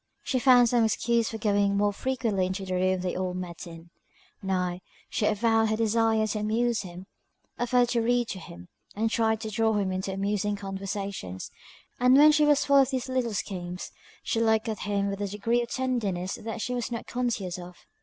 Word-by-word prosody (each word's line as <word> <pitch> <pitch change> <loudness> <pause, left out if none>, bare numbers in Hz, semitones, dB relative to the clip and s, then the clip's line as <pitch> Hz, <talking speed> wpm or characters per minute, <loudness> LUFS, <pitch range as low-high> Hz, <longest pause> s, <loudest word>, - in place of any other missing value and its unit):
She 260 - 0
found 245 -2 +6
some 235 0 +3
excuse 230 +1 +1
for 225 - -5
going 205 -2 +1
more 205 0 +2
frequently 225 -6 -1
into 190 +1 -4
the 185 - -4
room 185 0 +1
they 180 -1 -2
all 185 -1 -2
met 180 -2 -6
in; 165 0 -12 0.5
nay, 180 -2 -1 0.3
she 210 - +1
avowed 225 +1 +2
her 220 - +1
desire 225 0 +2
to 215 0 -2
amuse 225 +2 0
him: 180 0 -9 0.5
offered 245 0 +2
to 235 -2 +1
read 240 +1 +1
to 190 - -5
him, 90 - -11 0.3
and 220 +2 0
tried 220 -1 +1
to 220 -1 -5
draw 220 +1 +1
him 200 -3 0
into 190 +1 -3
amusing 205 +1 -1
conversations; 195 - -5 0.5
and 250 +2 +5
when 300 +2 +8
she 300 0 +4
was 290 -1 +3
full 280 -1 +4
of 270 -2 +5
these 260 -1 -3
little 250 -4 -1
schemes, 180 -2 -5 0.3
she 225 - -1
looked 220 0 +2
at 220 -1 -3
him 200 -1 -1
with 200 0 -4
a 205 - -1
degree 220 +4 0
of 235 - -5
tenderness 215 -9 -2
that 225 0 -6
she 250 - -2
was 245 -1 -3
not 235 - -4
conscious 225 -8 -2
of. 180 0 -12
215 Hz, 200 wpm, -27 LUFS, 190-235 Hz, 0.5 s, when